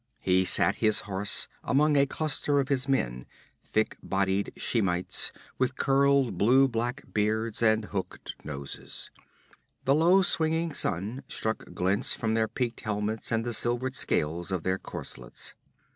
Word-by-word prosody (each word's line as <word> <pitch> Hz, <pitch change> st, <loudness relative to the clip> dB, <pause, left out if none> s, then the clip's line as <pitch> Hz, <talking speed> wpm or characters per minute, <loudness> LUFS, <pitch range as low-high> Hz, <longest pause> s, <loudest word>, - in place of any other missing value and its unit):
He 95 Hz, 0 st, +3 dB
sat -, -, +4 dB
his 110 Hz, -1 st, +3 dB
horse 100 Hz, 0 st, 0 dB, 0.2 s
among 150 Hz, +2 st, +3 dB
a 140 Hz, 0 st, +4 dB
cluster 145 Hz, 0 st, 0 dB
of 135 Hz, 0 st, -1 dB
his 135 Hz, -1 st, 0 dB
men 60 Hz, -, -1 dB, 0.4 s
thick 110 Hz, 0 st, -1 dB
bodied 95 Hz, +1 st, 0 dB
Shemites 95 Hz, -6 st, 0 dB, 0.3 s
with 130 Hz, +1 st, 0 dB
curled 135 Hz, -7 st, +2 dB
blue 130 Hz, +6 st, +5 dB
black 120 Hz, +3 st, -2 dB
beards 110 Hz, +2 st, 0 dB
and 110 Hz, -1 st, +3 dB
hooked 95 Hz, -3 st, -5 dB
noses; 70 Hz, -2 st, -7 dB, 0.7 s
the 135 Hz, -, +4 dB
low 175 Hz, +6 st, +5 dB
swinging 160 Hz, -1 st, +1 dB
sun 105 Hz, +8 st, -2 dB
struck 110 Hz, -5 st, -3 dB
glints 95 Hz, +6 st, 0 dB
from 110 Hz, -2 st, -1 dB
their 110 Hz, 0 st, +2 dB
peaked 120 Hz, +1 st, -3 dB
helmets 105 Hz, 0 st, -2 dB
and 115 Hz, 0 st, 0 dB
the 120 Hz, -, -2 dB
silvered 120 Hz, +3 st, -1 dB
scales 85 Hz, -, -1 dB
of 90 Hz, -4 st, -2 dB
their 95 Hz, 0 st, 0 dB
corselets. -, -, -8 dB
110 Hz, 145 wpm, -28 LUFS, 95-135 Hz, 0.7 s, blue